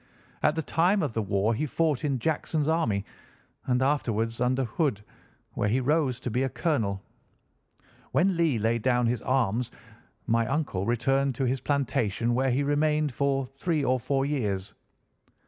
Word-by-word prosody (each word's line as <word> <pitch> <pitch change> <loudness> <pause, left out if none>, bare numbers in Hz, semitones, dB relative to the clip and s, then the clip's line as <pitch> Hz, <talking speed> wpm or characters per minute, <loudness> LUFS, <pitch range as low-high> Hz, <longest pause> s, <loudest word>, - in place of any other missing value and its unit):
At - - +3
the 160 - -1
time 180 +5 +2
of 140 -7 -2
the 110 - 0
war 100 +2 +1
he 150 +7 -1
fought 155 -2 0
in 140 -3 0
Jackson's 150 +2 -1
army, 125 -12 +1 0.6
and 125 0 +2
afterwards 115 -5 0
under 130 +2 +2
Hood, 120 - -1 0.5
where 105 - -1
he 120 +5 +2
rose 135 -2 +1
to 125 - -3
be 125 +4 0
a 135 - +1
colonel. 110 - -1 1.1
When 180 +8 +2
Lee 165 -7 +2
laid 115 +2 0
down 125 0 +2
his 115 -2 0
arms 125 -2 0 0.6
my 115 -1 +1
uncle 135 -9 -1
returned 135 +3 +1
to 135 - -2
his 130 +1 -1
plantation, 120 -5 0
where 130 +2 +1
he 130 +3 +1
remained 150 +1 +1
for 135 0 0
three 165 -5 0
or 130 0 +2
four 135 +3 0
years. 105 -9 -2
130 Hz, 165 wpm, -27 LUFS, 115-145 Hz, 1.1 s, At